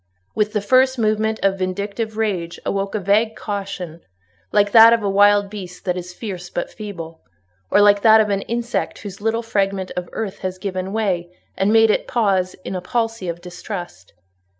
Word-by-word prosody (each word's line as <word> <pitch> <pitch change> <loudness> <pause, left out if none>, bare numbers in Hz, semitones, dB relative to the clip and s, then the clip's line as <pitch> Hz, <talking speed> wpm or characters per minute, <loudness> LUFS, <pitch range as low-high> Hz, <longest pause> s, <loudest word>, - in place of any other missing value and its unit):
With 210 0 0
the 210 - 0
first 260 +5 +3
movement 220 0 0
of 195 0 +2
vindictive 200 +4 -3
rage 180 -6 -2
awoke 195 +1 -2
a - - 0
vague 210 +3 +2
caution, 195 -5 -5 0.5
like 205 -1 +3
that 225 +1 +9
of 230 -2 +1
a - - 0
wild 205 0 +5
beast 185 -3 -9
that 180 -2 0
is 180 -1 -6
fierce 180 -2 -7
but 175 - -4
feeble—or 170 -7 -8 0.6
like 205 0 +5
that 220 0 +7
of 210 -1 +2
an 200 0 0
insect 235 0 -2
whose 205 -1 -8
little 225 +2 0
fragment 195 -4 -1
of 180 -1 -4
earth 210 -4 -4
has 185 0 -4
given 185 0 -4
way, 190 -5 -1 0.2
and 195 +2 +1
made 225 0 +5
it - - -1
pause 195 -6 +1
in 190 - -4
a 180 - -3
palsy 225 0 -2
of 170 0 -5
distrust. 175 - -8
200 Hz, 180 wpm, -20 LUFS, 185-220 Hz, 0.6 s, that